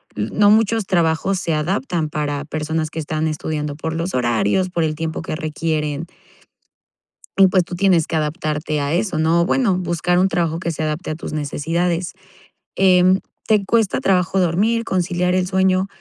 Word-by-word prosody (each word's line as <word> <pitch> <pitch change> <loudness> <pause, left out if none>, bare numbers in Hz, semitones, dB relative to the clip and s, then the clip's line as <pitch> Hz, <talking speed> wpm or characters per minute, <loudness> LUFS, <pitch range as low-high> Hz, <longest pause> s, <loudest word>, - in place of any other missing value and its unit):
no 160 - +2
muchos 220 -1 +3
trabajos 170 +2 +1
se 165 - -1
adaptan 170 - -1
para 145 -1 -2
personas 155 0 -2
que 165 - -11
están 155 +1 -2
estudiando 150 -1 -3
por 160 +1 -4
los 165 -1 -3
horarios, 120 - +1
por 170 -2 0
el 155 -1 -1
tiempo 160 +1 -4
que 165 - -4
requieren. 155 0 -2 1.3
Y 195 -1 +7
pues, 185 -1 +2
tú 175 - -7
tienes 180 -4 +3
que 165 - -2
adaptarte 150 -1 -2
a 140 +2 -1
eso, 185 -2 -1
¿no? 165 +2 +3
Bueno, 210 -1 +2
buscar 175 0 0
un 190 +1 +3
trabajo 165 -3 -1
que 170 - -3
se 160 - -4
adapte 155 +2 -3
a - - -1
tus 160 - -7
necesidades. 165 +4 -1 0.6
Em, 185 0 +4 0.3
te 210 -3 +3
cuesta 225 -2 +1
trabajo 190 0 +1
dormir, 205 +7 +1
conciliar 180 0 0
el 185 -1 +1
sueño. 190 0 +2
170 Hz, 170 wpm, -20 LUFS, 155-185 Hz, 1.3 s, Y